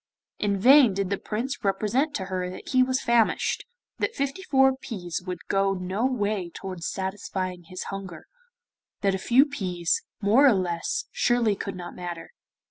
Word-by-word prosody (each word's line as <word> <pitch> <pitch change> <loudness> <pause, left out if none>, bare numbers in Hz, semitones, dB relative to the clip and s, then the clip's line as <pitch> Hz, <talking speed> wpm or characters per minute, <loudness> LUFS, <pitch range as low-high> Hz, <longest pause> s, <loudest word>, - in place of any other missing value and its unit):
In 200 -1 +1
vain 255 -2 +7
did 195 -1 -1
the 200 - 0
Prince 240 +6 -4
represent 215 +9 +1
to 190 - -2
her 185 -1 -3
that 185 - -9
he 260 -1 +4
was 255 +1 +1
famished 235 -2 +2 0.3
that 465 - -1
fifty 280 +7 -2
four 265 -6 +4
peas 185 -11 -5
would 180 - -5
go 195 0 +2
no 190 +6 -1
way 205 -7 -1
towards 185 -1 -6
satisfying 190 -2 -4
his 185 +2 -6
hunger 190 -4 -7 0.8
that 195 -1 +2
a 190 - -2
few 250 +8 +5
peas, 180 - -1 0.2
more 230 +7 +5
or 260 - +6
less, 175 -3 -1
surely 240 - +2
could 195 0 -5
not 175 -1 -7
matter. 175 -2 -7
200 Hz, 165 wpm, -26 LUFS, 185-255 Hz, 0.8 s, vain